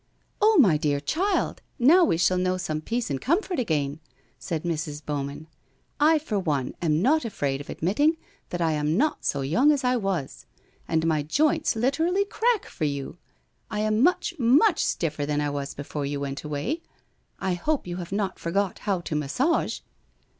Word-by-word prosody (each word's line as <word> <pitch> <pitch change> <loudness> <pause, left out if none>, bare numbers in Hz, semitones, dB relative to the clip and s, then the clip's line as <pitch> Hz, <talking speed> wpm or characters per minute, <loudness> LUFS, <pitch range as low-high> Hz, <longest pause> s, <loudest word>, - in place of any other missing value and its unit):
' - - -42
Oh, 430 0 +5
my 185 - +6
dear 145 -1 0
child, 360 - -1 0.2
now 320 +9 +6
we 240 - +2
shall 180 +2 +2
know 185 0 +1
some 155 -4 -3
peace 230 +2 -2
and 135 - -2
comfort 355 +3 0
again! 150 - -1 0.2
' 130 - -36
said 160 -2 -3
Mrs. 155 -3 -3
Bowman, 145 +1 -4 0.3
' - - -43
I 310 +2 +5
for 245 -9 -2
one 145 -8 -1
am 160 0 +1
not 310 +6 +3
afraid 140 -11 -2
of 145 - -12
admitting 290 - +1 0.3
that 175 - -3
I 165 -1 +2
am 150 +2 0
not 300 +6 +1
so 140 - 0
young 230 - +3
as 285 -2 0
I 250 0 +2
was. 190 - -3 0.4
And 160 0 +1
my 155 -2 +2
joints 300 - +1
literally 325 - +1
crack 450 0 +1
for 155 - -4
you. 140 +3 -4 0.5
I 210 - -2
am 215 +1 +1
much, 345 +3 +2
much 285 - +4
stiffer 155 -3 -1
than 145 0 -1
I 145 -1 -1
was 140 -1 -4
before 145 0 -4
you 140 0 -3
went 140 0 -4
way. 150 - -3 0.6
I 190 - -1
hope 290 - -1
you 175 0 -5
have 175 -1 -7
not 195 -2 -2
forgot 190 +3 -1
how 195 -4 -1
to 160 - -4
massage 250 - 0
180 Hz, 190 wpm, -25 LUFS, -, 0.6 s, my